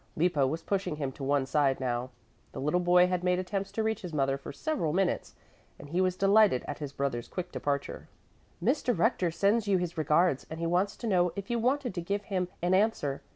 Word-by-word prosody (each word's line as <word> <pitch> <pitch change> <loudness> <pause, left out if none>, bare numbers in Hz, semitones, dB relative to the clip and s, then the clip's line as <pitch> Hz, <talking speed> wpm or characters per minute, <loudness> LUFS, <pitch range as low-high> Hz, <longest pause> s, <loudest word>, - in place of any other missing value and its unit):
Lippo 155 -5 +2
was 160 +4 -3
pushing 195 -6 -1
him 140 -3 -3
to 135 - -9
one 140 0 +1
side 135 -1 +1
now. 125 -1 -2 0.4
The - - -6
little 150 +6 +1
boy 180 0 +5
had 180 -1 -1
made 180 0 +2
attempts 195 +1 -3
to 220 - -1
reach 220 0 -1
his 180 -3 -7
mother 135 -1 +1
for 140 - -8
several 165 - -2
minutes, 190 0 0 0.4
and 145 - -11
he 175 +4 +1
was 185 -1 +1
delighted 200 -6 +4
at 145 - -5
his 145 -3 -5
brother's 135 -4 -3
quick 180 -1 -5
departure. 140 -1 -3 0.6
"Mr. 255 -5 +1
Rector 205 -6 +2
sends 205 +6 +1
you 195 -2 +3
his 175 -2 -3
regards 155 -1 +2
and 160 - -6
he 170 - -2
wants 180 +4 0
to - - -7
know 180 -4 +3
if 200 +3 -5
you 235 - +1
wanted 255 0 0
to 175 - -3
give 200 +4 -2
him 185 -3 -2 0.2
an 180 +1 +2
answer. 190 -9 +1
180 Hz, 220 wpm, -29 LUFS, 145-195 Hz, 0.6 s, boy